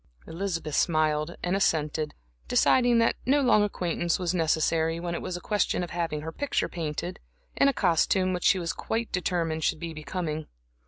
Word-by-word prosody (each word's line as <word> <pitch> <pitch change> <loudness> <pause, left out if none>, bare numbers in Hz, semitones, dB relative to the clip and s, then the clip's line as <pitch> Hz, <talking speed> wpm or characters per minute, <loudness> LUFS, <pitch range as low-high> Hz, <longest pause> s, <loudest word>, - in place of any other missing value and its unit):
Elizabeth 165 -3 -3
smiled 155 0 +1
and 180 +2 +1
assented, 155 -5 0 0.3
deciding 245 - +4
that 230 0 +3
no 280 +3 +3
long 245 -6 +4
acquaintance 175 -4 0
was 180 -1 -1
necessary, 165 -1 +1
when 170 0 -3
it - - -3
was 185 -1 -4
a - - -7
question 205 -1 0
of 175 - -6
having 165 -3 -2
her 160 +1 -5
picture 285 - -1
painted, 165 +1 -4 0.4
in 275 - +4
a - - +5
costume 185 - +2
which 180 - -3
she 195 - +5
was 170 -2 -2
quite 225 0 -3
determined 170 -3 -1
should - - +1
be 170 -1 -5
becoming. 155 0 -4
170 Hz, 175 wpm, -27 LUFS, 160-190 Hz, 0.4 s, a